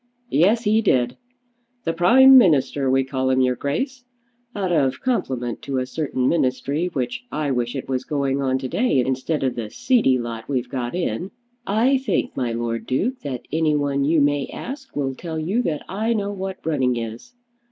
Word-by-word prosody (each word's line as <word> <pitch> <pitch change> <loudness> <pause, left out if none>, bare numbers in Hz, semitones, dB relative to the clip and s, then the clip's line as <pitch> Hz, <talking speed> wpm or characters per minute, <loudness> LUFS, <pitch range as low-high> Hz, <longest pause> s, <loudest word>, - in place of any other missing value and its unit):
"Yes, 210 +8 +3
he 215 +1 +3
did. 125 - +2 0.7
The 165 - -1
Prime 260 +11 +7
Minister, 145 - +4
we 135 +1 +3
call 130 0 -1
him, 130 0 +2
your 125 -1 +2
Grace, 250 - -3 0.5
out 190 -3 -1
of 140 -6 +1
compliment 130 - -2
to 135 -1 -3
a 130 - 0
certain 130 -2 -2
Ministry 140 +2 0
which 130 - -3
I 150 -2 -1
wish 120 0 -1
it 135 - -5
was 130 -1 -1
going 140 -2 -1
on 130 -1 +1
to 130 0 -4
day 145 - +1
instead 135 +3 -1
of 130 -2 +1
the 115 -3 -5
seedy 220 - +2
lot 115 -1 -6
we've 125 -3 -1
got 125 0 -3
in. 180 +1 -2 0.4
I 240 +7 +3
think, 250 -7 -1
my 125 -3 -1
Lord 115 0 -3
Duke, 240 - -1
that 130 -4 -6
any 155 0 +2
one 140 -1 0
you 155 +2 +3
may 145 -1 +1
ask 270 0 -8
will 135 -2 -1
tell 160 +4 -6
you 185 +10 0
that 155 -10 -3
I 220 +5 -1
know 205 -2 -1
what 190 -1 -6
running 130 -6 +1
is. 115 - -7
140 Hz, 185 wpm, -22 LUFS, 130-190 Hz, 0.7 s, Prime